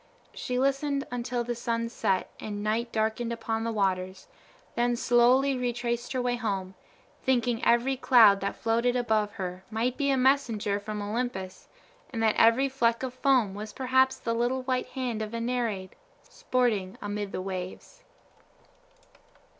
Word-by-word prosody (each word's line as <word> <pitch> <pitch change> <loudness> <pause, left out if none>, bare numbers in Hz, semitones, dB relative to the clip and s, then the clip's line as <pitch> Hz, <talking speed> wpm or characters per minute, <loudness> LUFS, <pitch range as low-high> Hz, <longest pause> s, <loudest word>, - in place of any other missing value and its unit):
She 250 - -3
listened 275 +1 0
until 245 0 -2
the 240 +1 -2
sun 230 0 -2
set 195 -5 -1
and 205 -1 -5
night 225 +3 -1
darkened 220 +2 -1
upon 225 -1 -2
the 230 - -1
waters, 190 -3 -1 0.5
then 240 0 +1
slowly 250 +3 +4
retraced 240 -1 -2
her 255 - 0
way 245 0 0
home, 195 -5 -3 0.5
thinking 245 -3 +1
every 245 +3 +3
cloud 225 -6 +6
that 200 - -2
floated 235 +2 +1
above 220 -4 +1
her 185 -1 -5
might 230 +3 -1
be 280 -1 +1
a 270 - +3
messenger 235 -6 +2
from 210 0 -5
Olympus, 205 -4 -4 0.4
and 225 -2 -3
that 220 -1 +4
every 230 +4 +5
fleck 240 -3 +1
of 255 -1 -3
foam 255 -6 +2
was 210 +1 -7
perhaps 260 0 +2
the 230 - -2
little 245 +3 0
white 255 0 -1
hand 245 -5 -3
of 215 +1 -4
a - - -2
nereid, 230 -6 -2 0.3
sporting 220 -7 -1
amid 205 -1 -4
the - - -4
waves. 185 - -6
235 Hz, 155 wpm, -28 LUFS, 210-250 Hz, 0.5 s, cloud